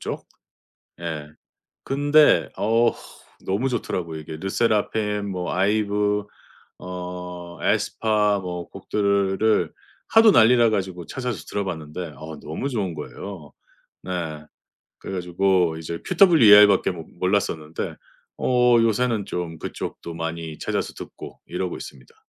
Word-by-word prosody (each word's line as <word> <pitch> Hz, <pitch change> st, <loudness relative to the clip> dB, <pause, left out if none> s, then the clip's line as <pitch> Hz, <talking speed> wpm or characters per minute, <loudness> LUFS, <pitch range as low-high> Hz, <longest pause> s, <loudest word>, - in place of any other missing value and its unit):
쪽. -, -, -5 dB, 0.7 s
예. 80 Hz, -3 st, -5 dB, 0.6 s
근데 145 Hz, +2 st, +4 dB
어 115 Hz, +3 st, +3 dB, 0.5 s
너무 110 Hz, +8 st, 0 dB
좋더라고요 85 Hz, -9 st, -3 dB
이게. 80 Hz, 0 st, -8 dB
르세라핌 105 Hz, +1 st, 0 dB
뭐 90 Hz, -3 st, -3 dB
아이브 105 Hz, +1 st, +1 dB, 0.5 s
어 90 Hz, -1 st, -7 dB
에스파 105 Hz, -2 st, +1 dB
뭐 90 Hz, -1 st, -5 dB
곡들을 100 Hz, +1 st, +1 dB, 0.4 s
하도 225 Hz, -1 st, +7 dB
난리 120 Hz, -1 st, +6 dB
나가지고 95 Hz, -7 st, +1 dB
찾아서 125 Hz, -8 st, -4 dB
들어봤는데 85 Hz, -4 st, -4 dB
어 80 Hz, -1 st, -8 dB
너무 80 Hz, -, -4 dB
좋은 100 Hz, -8 st, -2 dB
거예요. 75 Hz, 0 st, -8 dB, 0.5 s
네. 80 Hz, -4 st, -4 dB, 0.5 s
그래 -, -, -7 dB
가지고 90 Hz, -1 st, +1 dB
이제 85 Hz, +1 st, -5 dB
QWER밖에 110 Hz, -, +7 dB
모 85 Hz, -2 st, -8 dB
몰랐었는데 85 Hz, -5 st, -1 dB, 0.4 s
어 125 Hz, -1 st, +4 dB
요새는 115 Hz, -1 st, +1 dB
좀 85 Hz, -2 st, -4 dB
그쪽도 85 Hz, -, -6 dB
많이 80 Hz, -1 st, -5 dB
찾아서 -, -, -2 dB
듣고 -, -, -10 dB
이러고 90 Hz, 0 st, -3 dB
있습니다. 65 Hz, -2 st, -11 dB
95 Hz, 260 characters per minute, -23 LUFS, 85-110 Hz, 0.7 s, 하도